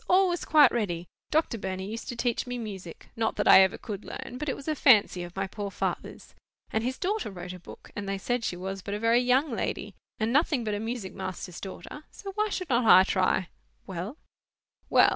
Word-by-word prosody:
All 380 +1 +5
was 350 -1 -2
quite 300 -4 +6
ready. 175 -7 -1 0.2
Doctor 310 -7 +1
Burney 190 -1 -4
used 225 +5 -6
to 245 - -4
teach 235 +1 -1
me 245 0 -3
music: 195 -7 -8
not 225 -1 0
that 205 - 0
I 190 - +10
ever 190 -1 +3
could 210 -3 -6
learn, 250 - -7
but 300 0 -2
it - - -1
was 280 - -11
a 310 - +2
fancy 220 -10 +5
of 175 0 -8
my 195 0 -1
poor 200 +1 -5
father's. - - -4 0.4
And 220 - 0
his 255 +2 -2
daughter 415 - -1
wrote 180 -2 -7
a 180 - -9
book, 175 - -13
and 200 -1 -4
they 195 - -1
said 245 +4 -1
she 175 - -2
was 190 +1 -5
but 200 +2 -4
a - - -3
very 230 +2 +4
young 255 +4 +2
lady, 230 - -3 0.3
and 225 +2 0
nothing 290 -3 +2
but 215 -2 -2
a 205 - -1
music 225 -3 -4
master's 185 -2 -6
daughter; 195 +8 -8
so 395 - -8
why 425 +2 0
should 365 -6 -3
not 240 0 +3
I 185 -4 +8
try?" 185 -2 +1 0.4
"Well?" 190 - -5 0.7
"Well! - - +6
220 Hz, 225 wpm, -28 LUFS, 190-255 Hz, 0.7 s, I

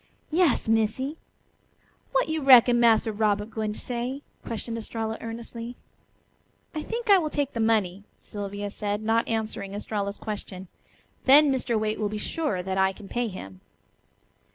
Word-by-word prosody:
"Yas, 330 -7 +2
Missy. 225 +6 +1 1.0
Wat - - +2
yo' 315 0 -1
reckon 245 -3 +7
Massa 225 -1 +4
Robert 210 0 0
gwine 215 -2 -2
to - - -9
say?" 250 +3 -4 0.2
questioned 230 0 -5
Estralla 225 0 -4
earnestly. 230 +1 -6 1.0
"I 310 - -3
think 470 +8 -4
I 390 - +8
will 310 -3 -1
take 285 -2 -2
the 230 - -3
money," 210 -4 +1 0.2
Sylvia 205 0 -5
said, 205 0 -3
not 225 +1 +2
answering 215 -3 -3
Estralla's 205 -1 -3
question; 190 -4 -6 0.6
"then 285 +2 +7
Mr. 240 -3 0
Waite 215 0 -1
will 210 -1 0
be 215 - -4
sure 210 - -2
that 190 +1 -2
I 190 0 +3
can 200 +1 -12
pay 240 +3 -1
him." 95 - -9
225 Hz, 155 wpm, -26 LUFS, 205-250 Hz, 1.0 s, I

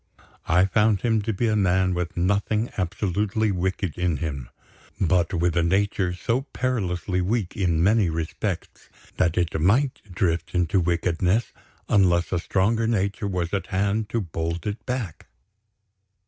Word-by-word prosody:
I 90 +4 +4
found 105 0 +2
him 110 -2 +2
to 110 - -2
be 110 +3 -1
a 110 - +2
man 95 -2 +2
with 90 -1 -3
nothing 100 +5 +1
absolutely 100 +3 0
wicked 95 -1 -2
in 90 -4 +1
him 70 -6 -4 0.5
but 90 -2 +2
with 85 -2 0
a 85 - +3
nature 95 +1 +1
so 115 +7 0
perilously 100 -9 -2
weak, 100 0 -1
in 85 -4 +1
many 105 -1 +3
respects, 80 0 -4 0.3
that 85 -2 +1
it 85 -3 0
might 125 - +2
drift 90 -2 -1
into 90 +2 +2
wickedness 90 +5 0 0.3
unless 90 -5 +3
a 90 - +1
stronger 110 +6 +1
nature 100 -1 0
was 90 -2 -2
at 100 - -1
hand 100 +3 0
to 115 +1 -1
bold 85 -1 -4
it 105 +1 -4
back. 125 - -4
95 Hz, 145 wpm, -24 LUFS, 85-105 Hz, 0.5 s, I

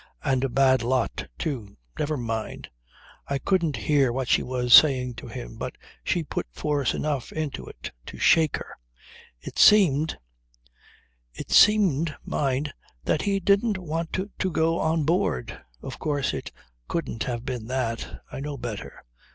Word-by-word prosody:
And 130 -1 +1
a 135 - +1
bad 130 0 +4
lot, 125 +2 -1
too. 120 - -4 0.2
Never 150 0 -1
mind. 115 -3 -4 0.6
I 140 - -1
couldn't 170 0 +1
hear 140 -4 +2
what 130 +1 -2
she - - +4
was 125 -1 0
saying 130 -4 +7
to - - -8
him, - - -8
but - - -5 0.3
she 170 - 0
put 145 - -4
force 145 - -1
enough 145 -5 -2
into 155 -3 -4
it - - -8 0.2
to - - -8
shake 160 -3 +4
her. - - -9 0.7
It - - -7
seemed 160 -8 +5 1.2
it - - -8
seemed, 170 -8 +5
mind! 140 +1 -1 0.3
that 150 - +1
he 200 -1 0
didn't 200 +3 +2
want 165 -2 -4
to 190 0 -2
go 165 +1 +1
on 160 0 +1
board. 140 - -1 0.2
Of - - -7
course 145 -3 -1
it - - -5 0.4
couldn't 165 -9 -3
have 120 -1 -4
been 125 -4 -4
that. 125 -3 -3
I - - -6
know 145 0 -5
better. 115 -4 -7
140 Hz, 150 wpm, -25 LUFS, 125-165 Hz, 1.2 s, saying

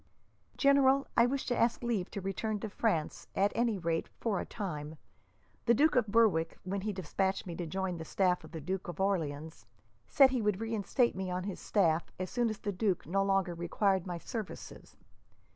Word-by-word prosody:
"General, 275 -1 +4
I 235 0 +5
wish 270 +2 -2
to 245 - 0
ask 235 +1 +1
leave 220 -6 -1
to 200 - -5
return 210 +3 -2
to 220 - -4
France, 185 -9 -1
at 200 +1 +3
any 230 -3 +1
rate 165 -2 -1
for 215 -5 0
a - - -5
time. 155 -7 -5 0.7
The 235 - +6
Duke 300 +5 +4
of 245 -4 +3
Berwick, 200 -7 +3
when 195 +1 -3
he 210 +2 -2
despatched 190 +1 -1
me 175 -2 -6
to 175 - -3
join 190 +1 -2
the - - -4
staff 180 +2 +1
of - - -12
the 160 - -6
Duke 185 +5 -3
of 175 -1 -7
Orleans, 160 -5 -2 0.4
said 270 -2 +6
he 255 -3 0
would 210 -2 +1
reinstate 225 +2 0
me 190 0 -3
on 180 0 -2
his 195 -1 -5
staff 170 -5 +1
as 185 0 -4
soon 240 -2 +1
as 215 - -4
the 205 - -3
duke 195 -1 0
no 195 +4 +1
longer 195 -2 +1
required 185 +2 0
my 175 -1 -3
services. 215 +4 -7
195 Hz, 195 wpm, -32 LUFS, 180-225 Hz, 0.7 s, The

